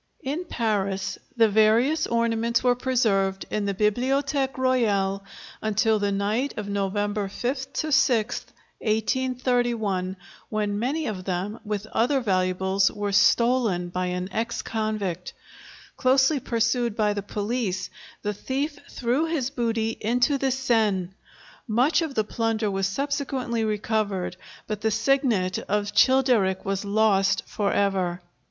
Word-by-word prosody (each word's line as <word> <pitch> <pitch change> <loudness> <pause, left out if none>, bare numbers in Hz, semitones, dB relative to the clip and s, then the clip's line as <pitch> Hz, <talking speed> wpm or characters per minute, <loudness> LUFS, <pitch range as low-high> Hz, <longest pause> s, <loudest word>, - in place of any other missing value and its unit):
] - - -34
In 350 +4 -4
Paris 200 - -1 0.2
the 225 -1 +6
various 225 +9 +3
ornaments 235 0 +1
were 250 -1 +4
preserved 220 -7 +1
in 210 -1 -1
the 200 - 0
Bibliothèque 265 +6 0
Royale 205 -7 +1 0.4
until 220 0 +2
the 205 0 0
night 210 +7 -1
of 210 -2 -4
November 205 +1 -1
5 260 +6 -3
6, 250 -7 +1 0.3
1831, 230 -4 0 0.3
when 205 -1 -1
many 290 +7 -1
of 185 -4 -4
them, 195 +4 -3
with 210 -1 -3
other 265 +4 +2
valuables, 190 -2 +1
were 205 -1 -3
stolen 220 -4 +3
by 180 +1 -2
an 180 0 -2
ex 230 +4 -2
convict. 215 -5 -3 0.6
Closely 265 +3 +3
pursued 235 -1 0
by 210 -2 +2
the 205 - -3
police, 205 -2 -3 0.3
the 210 - -1
thief 280 +7 -3
threw 250 +6 0
his 280 -6 -1
booty 225 -3 -1
into 245 +5 +2
the 270 - +1
Seine; 220 -8 +1 0.6
much 255 +9 +3
of 310 -5 -3
the 215 - +2
plunder 225 -1 -1
was 195 0 0
subsequently 265 -1 -2
recovered, 210 -4 -1 0.3
but 215 -1 -4
the 220 - +2
signet 220 -5 +1
of 205 0 0
Childeric 240 -6 +3
was 195 0 -1
lost 200 -1 +2
for 205 -2 -1
ever. 190 -3 0
220 Hz, 130 wpm, -25 LUFS, 200-250 Hz, 0.6 s, the